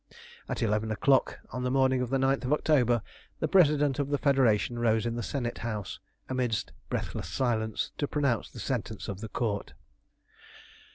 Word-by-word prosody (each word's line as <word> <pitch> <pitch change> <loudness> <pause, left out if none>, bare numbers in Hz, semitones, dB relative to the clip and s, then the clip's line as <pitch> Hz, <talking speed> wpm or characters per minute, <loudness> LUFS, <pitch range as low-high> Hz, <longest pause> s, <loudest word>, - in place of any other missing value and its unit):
At - - -2
eleven 110 0 +1
o'clock 130 +6 +2
on 125 - -4
the 125 - 0
morning 130 -1 +3
of 125 - -2
the 135 - +2
9th 135 +1 +1
of 130 - +2
October 125 -7 +3 0.4
the - - 0
President 150 -6 +4
of 140 -1 0
the 145 - +1
Federation 125 -4 +2
rose 115 -1 +2
in 115 0 -1
the 120 - -2
Senate 120 +1 -3
House, 105 -4 -4 0.3
amidst 125 -4 -1 0.2
breathless - - -3
silence, 110 -4 -1
to 145 - 0
pronounce 140 -6 0
the 120 - -11
sentence 110 -2 -3
of 100 0 -5
the 110 - -6
Court. 105 -3 -2
125 Hz, 170 wpm, -29 LUFS, 110-135 Hz, 0.4 s, President